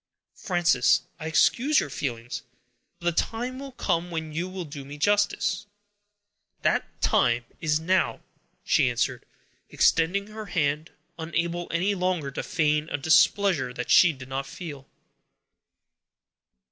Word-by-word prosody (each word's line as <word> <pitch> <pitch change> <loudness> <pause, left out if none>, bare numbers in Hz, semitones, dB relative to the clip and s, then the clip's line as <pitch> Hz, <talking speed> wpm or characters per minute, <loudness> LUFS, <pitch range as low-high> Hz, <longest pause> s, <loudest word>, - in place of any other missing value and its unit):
"Frances, 175 - +2 0.2
I 160 - -5
excuse 255 - +3
your 145 - -3
feelings; 120 -2 -4 0.6
but 175 -1 -1
the - - +5
time 245 +3 -5
will 275 -1 -8
come 175 -7 -1
when 160 -2 -4
you 170 +4 -2
will 185 -2 -6
do 145 -2 -8
me 145 +2 -9
justice." 205 +2 +1 1.0
"That - - 0
time 120 0 +2
is 155 -1 +1
now," 185 +4 +1 0.4
she - - +3
answered, - - -2 0.4
extending 180 +5 +2
her 215 0 -8
hand, 155 -2 -1 0.3
unable 170 +1 -2
any 185 +4 +1
longer 180 -6 -1
to - - -4
feign 150 -2 0
a - - -1
displeasure 160 -1 +3
that 125 - -3
she 180 - +7
did 130 -3 -11
not 135 +1 -4
feel. 145 -6 -8
165 Hz, 135 wpm, -26 LUFS, 145-190 Hz, 1.0 s, she